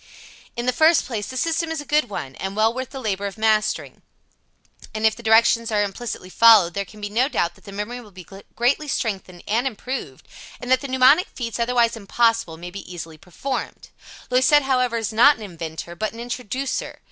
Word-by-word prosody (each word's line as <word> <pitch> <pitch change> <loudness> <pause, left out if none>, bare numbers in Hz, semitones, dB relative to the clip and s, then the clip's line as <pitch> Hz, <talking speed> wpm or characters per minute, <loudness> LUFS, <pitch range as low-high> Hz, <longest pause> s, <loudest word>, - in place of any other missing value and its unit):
In 240 - -3
the 250 - +1
first 315 +4 +4
place, 215 -5 -4
the 260 - -6
system 330 +3 0
is 320 -1 -3
a 290 - -7
good 295 -2 +1
one, 135 -9 -6
and 195 +1 -5
well 220 +2 +3
worth 255 0 -5
the 270 - -8
labor 200 -4 -2
of 200 - -8
mastering, 215 -1 0 0.9
and 215 0 -1
if 220 - +4
the - - -11
directions 230 +1 +4
are 210 -1 +2
implicitly 200 -1 -5
followed 215 -7 +6
there 200 +1 -2
can 210 +3 -15
be 205 - -3
no 240 +6 +1
doubt 170 - 0
that - - -23
the 200 - -9
memory 210 +5 -5
will 220 - -15
be 185 -3 -13 0.3
greatly 265 +6 +1
strengthened 195 -9 -3
and 235 +5 +1
improved, 245 - -6 0.3
and 250 0 -5
that 260 0 +4
the 280 - -5
mnemonic 260 +6 +5
feats 235 -2 -4
otherwise 235 -1 +2
impossible 225 -4 0
may 175 +2 -8
be 195 -1 -9
easily 165 -3 -8
performed. 195 - -5 0.4
Loisette, 260 +3 +5
however, 255 -3 +1
is 225 -1 -3
not 265 +7 +6
an 220 - -10
inventor, 170 -2 -7
but 215 +5 -3
an 230 - -10
introducer. 250 +2 -4
230 Hz, 205 wpm, -22 LUFS, 200-255 Hz, 0.9 s, followed